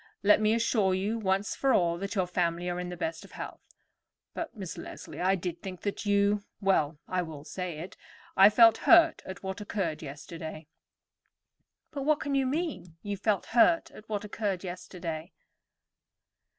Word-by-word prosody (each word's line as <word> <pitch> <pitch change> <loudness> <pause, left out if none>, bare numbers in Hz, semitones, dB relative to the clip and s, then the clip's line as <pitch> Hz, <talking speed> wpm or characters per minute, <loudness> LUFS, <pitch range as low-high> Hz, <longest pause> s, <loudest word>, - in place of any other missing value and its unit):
"Let 210 +1 +6
me 215 +1 +3
assure 215 -5 +2
you 205 +5 -1
once 195 0 0
for 270 -2 +3
all 170 -1 +2
that 200 +3 -4
your 190 -2 +2
family 175 -1 -1
are 175 - -3
in 180 0 -4
the 180 - -6
best 165 -1 -3
of - - -15
health; - - -7 0.7
but, 325 -8 -5
Miss 190 -4 -5
Leslie, - - -8
I 190 +2 +3
did 175 -2 -5
think 185 -2 -7
that 205 +1 -3
you—well, 200 -6 +1
I 185 0 0
will 155 -4 -7
say 180 0 -5
it, 175 +4 -8 0.4
I 195 +2 +9
felt 225 +1 +7
hurt 335 -1 +7
at 190 0 -8
what 190 +1 -4
occurred 190 -6 -2
yesterday." 155 +2 -8 1.3
"But 285 - -4
what 300 +2 +2
can 285 - -3
you 270 -1 +2
mean? 280 - -3
You 205 0 -2
felt 200 -1 0
hurt 250 +8 +4
at 215 - -14
what 210 -1 -2
occurred 200 -3 -2
yesterday! 175 -2 -6
190 Hz, 170 wpm, -29 LUFS, 175-215 Hz, 1.3 s, I